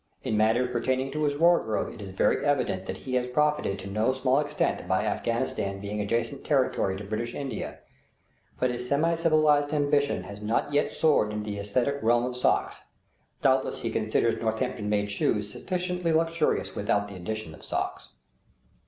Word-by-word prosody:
In 110 - -1
matters 115 +4 +2
pertaining 130 +2 0
to 150 +1 -1
his 145 -1 0
wardrobe 165 -10 +2
it 115 - -11
is 95 -2 -8
very - - +2
evident 125 -10 0
that - - -5
he 130 - -7
has 125 0 +1
profited 150 -6 +1
to 95 0 -8
no 110 +6 +1
small 130 +1 +2
extent 145 -1 -1
by - - +1
Afghanistan 100 0 -1
being 105 +1 -3
adjacent 115 +6 -1
territory 130 -9 +1
to 100 - -7
British 110 +4 -4
India; 135 -6 -4 0.8
but 125 -1 +2
his 125 0 -5
semi 160 +4 +2
civilized 155 -3 +3
ambition 145 -7 +1
has 100 +2 -9
not 115 +7 -1
yet 145 - +2
soared 150 -9 +2
into 105 0 -4
the 100 - -4
aesthetic 125 +8 0
realm 120 +1 +3
of 125 0 -4
socks; 125 - +1 0.6
doubtless 130 0 +2
he 115 - -1
considers 110 +1 +1
Northampton 110 -1 -1
made 105 -1 0
shoes 105 +1 0
sufficiently 180 - -2
luxurious 165 0 +1
without 100 0 0
the 100 - -9
addition 90 -2 -5
of - - -13
socks. - - -3
125 Hz, 170 wpm, -27 LUFS, 105-145 Hz, 0.8 s, civilized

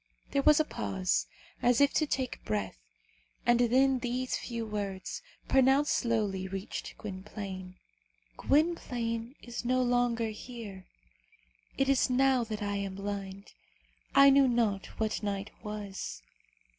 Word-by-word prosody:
There 280 - +2
was 300 +2 +6
a 310 - +3
pause, 95 - -1 0.3
as 245 -1 +4
if 285 0 +4
to 310 - +2
take 260 -3 -2
breath, 100 - -2 0.7
and 240 0 +4
then 260 +2 +4
these 250 +1 -1
few 235 -2 -4
words, 205 - -4 0.3
pronounced 270 +2 +4
slowly, 210 -6 0
reached 195 +1 -6
Gwynplaine. 190 -2 -7 0.6
"Gwynplaine 245 - 0
is 240 0 -5
no 255 +1 +2
longer 245 -2 +1
here. 215 -4 -8 0.9
It 270 - +2
is 275 -1 +3
now 260 0 +3
that 215 -1 -4
I 205 0 -1
am 195 -1 -3
blind. 200 0 -6 0.6
I 275 0 +9
knew 275 0 +6
not 225 -5 +1
what 220 -1 0
night 200 -1 -3
was. 200 - -6
230 Hz, 130 wpm, -30 LUFS, 195-255 Hz, 0.9 s, I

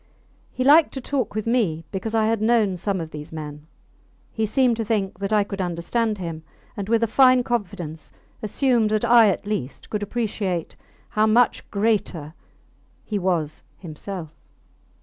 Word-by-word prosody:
He 255 - -2
liked 300 +4 +6
to - - -3
talk 255 -5 -2
with 215 - -2
me 205 -10 0
because 215 +3 -3
I 220 -1 +3
had 225 -1 +1
known 220 -4 +3
some 190 +2 -2
of 160 -1 -6
these 150 0 -8
men: 150 -1 -8 0.6
he 220 -1 -1
seemed 250 +1 +3
to 230 - -1
think 200 -4 -1
that 200 +1 -3
I 210 -1 +4
could 200 -1 -5
understand 195 +6 -1
him, 165 -4 -5 0.3
and, 200 -2 -5
with 230 0 +3
a - - +3
fine 255 +2 +5
confidence, 180 -10 -4 0.3
assumed 230 0 +1
that 215 +2 +1
I, 235 -1 +7
at 195 - -2
least, 200 -11 -4
could 210 - -2
appreciate 205 -5 -2 0.3
how 215 0 +2
much 235 +2 +2
greater 200 -8 -1 0.7
he 210 -2 -2
was 170 -5 -1 0.2
himself. 170 -1 -7
210 Hz, 165 wpm, -23 LUFS, 175-230 Hz, 0.7 s, I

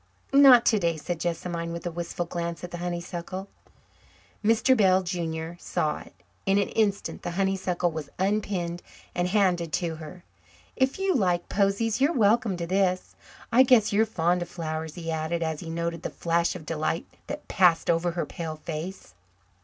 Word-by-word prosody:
"Not 270 -4 +8
today," 170 -7 +2
said 170 +2 -4
Jessamine, 170 0 -3
with 170 0 -6
a 175 - -2
wistful 175 +1 -4
glance 170 0 -4
at 175 - -6
the 175 - -6
honeysuckle. 175 +2 -4 1.0
Mr. 230 +4 +4
Bell, 190 -4 +4
junior, 170 -2 -3
saw 150 -1 -1
it. - - -14 0.3
In 195 +1 +4
an 200 - +1
instant 205 -3 0
the - - -4
honeysuckle 190 -3 0
was 155 -3 -6
unpinned 190 -3 -1 0.3
and 175 0 0
handed 180 -4 +2
to 170 -3 -1
her. 160 +3 -10 0.5
"If 260 +1 +1
you 385 0 +1
like 180 - +1
posies, 205 +4 +1
you're 290 +5 +4
welcome 215 -2 +3
to 170 - -3
this. 185 0 0 0.4
I 245 - +6
guess 245 -5 +5
you're 220 +2 +3
fond 175 -3 +1
of 175 - -4
flowers," 160 -2 -4
he 165 -2 -4
added, 160 +1 -1
as 160 -2 -2
he 165 - -7
noted 170 0 -3
the - - -3
flash 170 +1 0
of 165 -4 -8
delight 165 +1 -1 0.2
that 295 +1 -6
passed 180 -4 +3
over 170 +1 +1
her 170 - -2
pale 160 -2 -5
face. 160 - -6
175 Hz, 170 wpm, -27 LUFS, 170-200 Hz, 1.0 s, Not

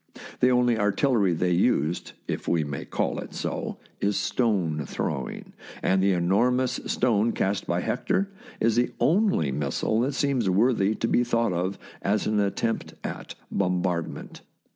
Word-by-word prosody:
The 125 - +5
only 125 -2 +3
artillery 105 -1 +2
they 90 +2 +1
used, 85 -1 +1
if - - -4
we 85 -2 +2
may 70 -2 -5
call - - -1
it - - -8
so, - - -3 0.2
is 100 0 +1
stone 90 - 0
throwing, 65 -2 -4 0.3
and 95 0 +3
the 95 0 +3
enormous 120 +9 +2
stone 115 -2 +2
cast 100 +1 -1
by 85 +1 0
Hector 195 - -1 0.3
is 115 -1 +2
the 120 - +2
only 170 - +2
missile 75 +10 0
that 130 +4 0
seems 135 -9 +1
worthy 105 +1 +3
to 115 - -1
be 120 - +3
thought 115 -4 +1
of 90 +3 -1 0.2
as 105 +2 +1
an 105 0 +1
attempt 105 +3 -1
at - - -6 0.2
bombardment. 90 -3 -2
100 Hz, 150 wpm, -26 LUFS, 90-120 Hz, 0.3 s, The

